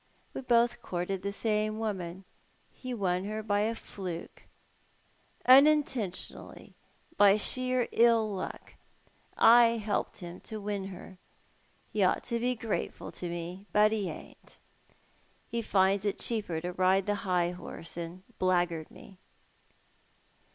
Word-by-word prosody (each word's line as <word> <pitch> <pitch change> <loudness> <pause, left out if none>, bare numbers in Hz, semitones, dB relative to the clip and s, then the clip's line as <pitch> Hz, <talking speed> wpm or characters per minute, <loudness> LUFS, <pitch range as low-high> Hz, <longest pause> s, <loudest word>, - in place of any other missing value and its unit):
"We - - -5
both 240 -2 +2
courted 180 +1 -3
the 200 +1 -3
same 215 0 0
woman 190 -4 -4 0.2
— - - -36
he 255 - -5
won 190 -5 -1
her 215 +1 -4
by 205 -1 +1
a 220 +2 0
fluke. 180 -6 -8 1.0
Unintentionally 265 -7 +3 0.2
— 330 - -32
by 205 0 +7
sheer 255 +3 0
ill 230 -1 +4
luck 190 - -6 0.4
— - - -35
I 235 0 +7
helped 210 -1 -2
him 175 0 -8
to 220 - -7
win 200 -1 -3
her. 185 0 -11 0.7
He 210 - 0
ought 185 - +2
to 235 -1 -1
be 250 +1 0
grateful 225 -2 -4
to 175 - -5
me, 175 +4 -6
but 210 +1 +5
he 210 -4 -1
ain't. - - -11 0.9
He 235 - -1
tinds 195 -2 +2
it 205 -2 -1
cheaper 205 -8 -2
to 180 +1 -4
ride 185 +1 +3
the 205 - +1
high 180 -4 +1
horse 175 -2 -9
and 170 +2 -7 0.2
blackguard 175 -3 +1
me." 190 -2 -15
205 Hz, 140 wpm, -30 LUFS, 185-225 Hz, 1.0 s, by